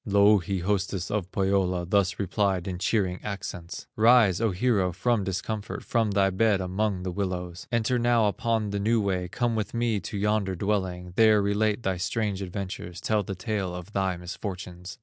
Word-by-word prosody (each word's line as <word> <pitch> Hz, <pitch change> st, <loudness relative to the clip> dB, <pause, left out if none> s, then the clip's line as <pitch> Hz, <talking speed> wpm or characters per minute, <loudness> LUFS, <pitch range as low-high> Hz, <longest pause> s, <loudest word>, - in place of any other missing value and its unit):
Louhi, 100 Hz, -2 st, +3 dB
hostess 95 Hz, -1 st, -1 dB
of 100 Hz, -3 st, -2 dB
Pohyola, 95 Hz, -2 st, +1 dB
Thus 95 Hz, +1 st, +1 dB
replied 100 Hz, -1 st, 0 dB
in 90 Hz, -2 st, -4 dB
cheering 95 Hz, -3 st, 0 dB
accents: 95 Hz, -4 st, -6 dB
"Rise, 110 Hz, -4 st, +5 dB
O 115 Hz, -, +3 dB
hero, 100 Hz, -1 st, +1 dB
from 105 Hz, +4 st, 0 dB
discomfort, 100 Hz, +3 st, -4 dB
From 115 Hz, -2 st, +1 dB
thy 100 Hz, -1 st, +2 dB
bed 100 Hz, +1 st, +2 dB
among 95 Hz, +1 st, -1 dB
the 90 Hz, -, -3 dB
willows; 90 Hz, -2 st, -4 dB
Enter 120 Hz, +1 st, +1 dB
now 120 Hz, -2 st, +3 dB
upon 110 Hz, 0 st, 0 dB
the 100 Hz, -, -1 dB
new 115 Hz, +3 st, +2 dB
way, 95 Hz, -3 st, -1 dB
Come 120 Hz, +5 st, -1 dB
with 110 Hz, +1 st, -3 dB
me 115 Hz, -3 st, +1 dB
to 100 Hz, -, -6 dB
yonder 100 Hz, -2 st, 0 dB
dwelling, 90 Hz, -2 st, -2 dB
There 110 Hz, -1 st, +6 dB
relate 105 Hz, +2 st, +1 dB
thy 95 Hz, -1 st, 0 dB
strange 100 Hz, +2 st, -1 dB
adventures, 90 Hz, -2 st, -5 dB
Tell 110 Hz, -1 st, +1 dB
the 95 Hz, 0 st, -5 dB
tale 95 Hz, -2 st, -3 dB
of 90 Hz, +4 st, -9 dB
thy 95 Hz, -2 st, 0 dB
misfortunes." 90 Hz, +1 st, -7 dB
100 Hz, 170 wpm, -27 LUFS, 90-110 Hz, -, There